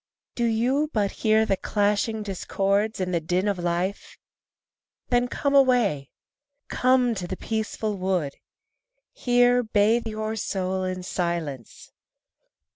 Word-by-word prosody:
Do 240 Hz, -, -1 dB
you 250 Hz, +7 st, +1 dB
but 205 Hz, -3 st, +1 dB
hear 220 Hz, 0 st, +4 dB
the 195 Hz, -, +1 dB
clashing 210 Hz, +2 st, 0 dB
discords 200 Hz, +2 st, -1 dB
and 185 Hz, -1 st, -2 dB
the 170 Hz, -, +2 dB
din 180 Hz, +5 st, 0 dB
of 200 Hz, -3 st, -1 dB
life? 175 Hz, +3 st, -2 dB, 0.9 s
Then 245 Hz, 0 st, +2 dB
come 280 Hz, +3 st, -1 dB
away, 245 Hz, -, +3 dB, 0.6 s
come 255 Hz, -1 st, +2 dB
to 185 Hz, -5 st, -5 dB
the 185 Hz, +1 st, -5 dB
peaceful 220 Hz, -1 st, -3 dB
wood, 185 Hz, -7 st, -1 dB, 0.8 s
Here 245 Hz, 0 st, +3 dB
bathe 220 Hz, +1 st, +2 dB
your 215 Hz, 0 st, -3 dB
soul 190 Hz, -3 st, -2 dB
in 185 Hz, 0 st, -4 dB
silence. 170 Hz, -, -4 dB
205 Hz, 120 wpm, -25 LUFS, 185-230 Hz, 0.9 s, hear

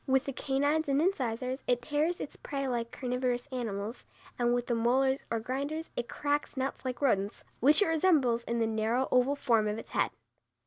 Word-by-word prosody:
With 265 Hz, 0 st, +3 dB
the 275 Hz, -, -3 dB
canines 285 Hz, +4 st, 0 dB
and 275 Hz, 0 st, +3 dB
incisors 260 Hz, -6 st, 0 dB
it 245 Hz, -1 st, +1 dB
tears 310 Hz, +4 st, 0 dB
its -, -, -5 dB
prey 275 Hz, -1 st, -4 dB
like 235 Hz, -2 st, -1 dB
carnivorous 250 Hz, -1 st, -1 dB
animals, 225 Hz, -2 st, -4 dB, 0.4 s
and 240 Hz, 0 st, +3 dB
with 245 Hz, 0 st, +1 dB
the 240 Hz, -, -1 dB
molars 260 Hz, +4 st, +2 dB
or 230 Hz, -, 0 dB
grinders 280 Hz, +7 st, -3 dB
it 240 Hz, -1 st, -3 dB
cracks 290 Hz, -1 st, -1 dB
nuts 265 Hz, +1 st, -2 dB
like 255 Hz, +1 st, -4 dB
rodents, 200 Hz, -6 st, +1 dB, 0.2 s
which 295 Hz, -, +6 dB
it -, -, 0 dB
resembles 300 Hz, -8 st, +3 dB
in 235 Hz, -, -1 dB
the 230 Hz, -, +2 dB
narrow, 225 Hz, +4 st, 0 dB
oval 255 Hz, +3 st, +3 dB
form 230 Hz, -6 st, +2 dB
of 210 Hz, +1 st, -1 dB
its -, -, -9 dB
head. -, -, +2 dB
255 Hz, 190 wpm, -30 LUFS, 235-280 Hz, 0.4 s, which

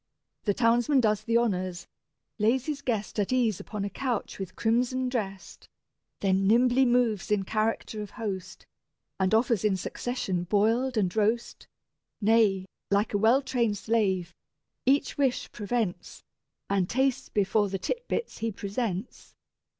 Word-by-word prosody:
The 205 Hz, -3 st, +1 dB
townsman 240 Hz, +4 st, +3 dB
does 215 Hz, -3 st, +2 dB
the 230 Hz, +1 st, +2 dB
honours, 185 Hz, -6 st, -1 dB, 0.5 s
lays 235 Hz, +5 st, +2 dB
his 295 Hz, -2 st, -3 dB
guest 225 Hz, -5 st, -2 dB
At 205 Hz, -, 0 dB
ease 235 Hz, -6 st, +2 dB
upon 210 Hz, -2 st, -5 dB
a -, -, -2 dB
couch 245 Hz, -3 st, -3 dB
with 185 Hz, -1 st, -6 dB
crimson 250 Hz, +3 st, +1 dB
dressed, 195 Hz, -6 st, -5 dB, 0.5 s
Then 195 Hz, 0 st, +2 dB
nimbly 245 Hz, +4 st, +4 dB
moves 240 Hz, -5 st, +1 dB
in 210 Hz, -2 st, +2 dB
character 215 Hz, +1 st, -1 dB
of 210 Hz, -, -6 dB
host, 190 Hz, -4 st, -5 dB, 0.5 s
And 190 Hz, -1 st, +2 dB
offers 230 Hz, -2 st, +2 dB
in 205 Hz, -3 st, +2 dB
succession 185 Hz, -3 st, -3 dB
boiled 225 Hz, +6 st, +1 dB
and 185 Hz, -3 st, +1 dB
roast; 220 Hz, +2 st, 0 dB, 0.5 s
Nay, 210 Hz, -3 st, +3 dB, 0.2 s
like 200 Hz, +2 st, +1 dB
a 205 Hz, -, +2 dB
well 235 Hz, +6 st, +4 dB
trained 235 Hz, -6 st, 0 dB
slave, 200 Hz, -5 st, 0 dB, 0.5 s
each 280 Hz, +2 st, +2 dB
wish 265 Hz, -3 st, 0 dB
prevents, 210 Hz, -5 st, -3 dB, 0.4 s
And 195 Hz, -2 st, 0 dB
tastes 265 Hz, +1 st, 0 dB
before 205 Hz, 0 st, +1 dB
the 195 Hz, -, -2 dB
tit 485 Hz, -, -4 dB
bits 470 Hz, -, -3 dB
he 225 Hz, 0 st, -1 dB
presents. 200 Hz, +1 st, -4 dB
220 Hz, 140 wpm, -28 LUFS, 195-245 Hz, 0.5 s, nimbly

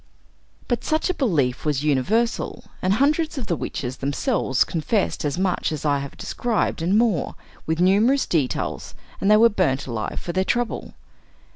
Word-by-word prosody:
But 240 Hz, -, -1 dB
such 315 Hz, +4 st, +1 dB
a -, -, -3 dB
belief 150 Hz, -, 0 dB
was 150 Hz, -2 st, 0 dB
universal, 190 Hz, -, 0 dB, 0.2 s
and 185 Hz, +1 st, +2 dB
hundreds 305 Hz, +5 st, +1 dB
of 255 Hz, -, -3 dB
the 175 Hz, -, 0 dB
witches 130 Hz, -4 st, -4 dB
themselves 140 Hz, -, +1 dB
confessed 145 Hz, -, -1 dB
as 145 Hz, +2 st, -1 dB
much 185 Hz, -3 st, 0 dB
as 155 Hz, -1 st, -4 dB
I 145 Hz, -1 st, +2 dB
have 140 Hz, 0 st, -7 dB
described, 235 Hz, -8 st, -1 dB
and 185 Hz, +5 st, +2 dB
more, 220 Hz, -, +1 dB, 0.3 s
with 160 Hz, +1 st, 0 dB
numerous 210 Hz, +9 st, +4 dB
details, 135 Hz, -, -2 dB, 0.2 s
and 195 Hz, -, +1 dB
they 210 Hz, -, +7 dB
were 230 Hz, +2 st, +7 dB
burnt 160 Hz, -, 0 dB
alive 115 Hz, -4 st, -4 dB
for 175 Hz, -, -5 dB
their 185 Hz, +1 st, +2 dB
trouble. 240 Hz, +4 st, -2 dB
180 Hz, 165 wpm, -23 LUFS, 140-230 Hz, 0.3 s, they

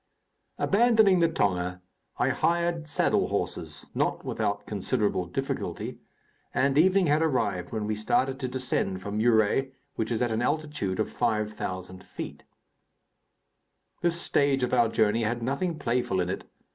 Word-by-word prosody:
Abandoning 220 Hz, -3 st, +4 dB
the 170 Hz, -, +5 dB
tonga, 90 Hz, -, 0 dB, 0.4 s
I -, -, +2 dB
hired 170 Hz, -1 st, 0 dB
saddle -, -, +2 dB
horses -, -, -3 dB
not -, -, -1 dB
without 105 Hz, -2 st, -2 dB
considerable 105 Hz, -2 st, -1 dB
difficulty 135 Hz, -, -4 dB, 0.6 s
and 135 Hz, 0 st, +2 dB
evening 185 Hz, +5 st, +5 dB
had 150 Hz, 0 st, +3 dB
arrived 110 Hz, -, 0 dB
when 110 Hz, -2 st, -2 dB
we 105 Hz, 0 st, -1 dB
started 130 Hz, +5 st, 0 dB
to 130 Hz, -, -2 dB
descend 125 Hz, -7 st, -1 dB
from 100 Hz, +3 st, -4 dB
Muré, 115 Hz, +4 st, +3 dB, 0.2 s
which 110 Hz, -, -1 dB
is 120 Hz, 0 st, 0 dB
at 120 Hz, -, 0 dB
an 110 Hz, +1 st, 0 dB
altitude 145 Hz, -9 st, -1 dB
of 110 Hz, -, +1 dB
5,000 100 Hz, -4 st, -2 dB
feet. -, -, -8 dB, 1.6 s
This 170 Hz, -1 st, +2 dB
stage 140 Hz, -5 st, +2 dB
of 125 Hz, -, -1 dB
our 120 Hz, -2 st, +4 dB
journey 110 Hz, 0 st, +2 dB
had 115 Hz, +2 st, -1 dB
nothing 155 Hz, +7 st, -1 dB
playful 120 Hz, -8 st, 0 dB
in 90 Hz, 0 st, 0 dB
it. -, -, -5 dB
120 Hz, 145 wpm, -27 LUFS, 105-150 Hz, 1.6 s, the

